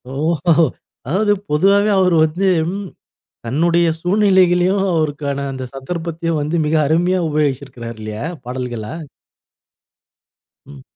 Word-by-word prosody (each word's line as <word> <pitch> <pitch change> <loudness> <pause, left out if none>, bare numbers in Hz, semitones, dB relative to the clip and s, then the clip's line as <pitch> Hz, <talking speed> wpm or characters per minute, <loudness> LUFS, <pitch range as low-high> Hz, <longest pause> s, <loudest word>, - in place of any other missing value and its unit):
ஓஹொஹோ! 165 +2 +2 0.4
அதாவது 205 +8 +1 0.2
பொதுவாவே 200 +7 +3
அவர் 180 -2 +3
வந்து, 175 +5 -1 0.3
ம் 200 0 -5 0.6
தன்னுடைய 170 +7 +2
சூழ்நிலைகளையும் 185 0 +3
அவருக்கான 145 -3 -1
அந்த 130 -1 -6
சந்தர்ப்பத்தையும் 165 +3 -3
வந்து 150 +3 -2
மிக 150 +1 0
அருமையா 175 +4 +2
உபயோகிச்சிருக்காரு 135 -6 -2
இல்லையா? 110 +3 -5 0.2
பாடல்களா. 125 -3 -5 1.7
ம். 70 -2 -13
160 Hz, 100 wpm, -18 LUFS, 135-180 Hz, 1.7 s, பொதுவாவே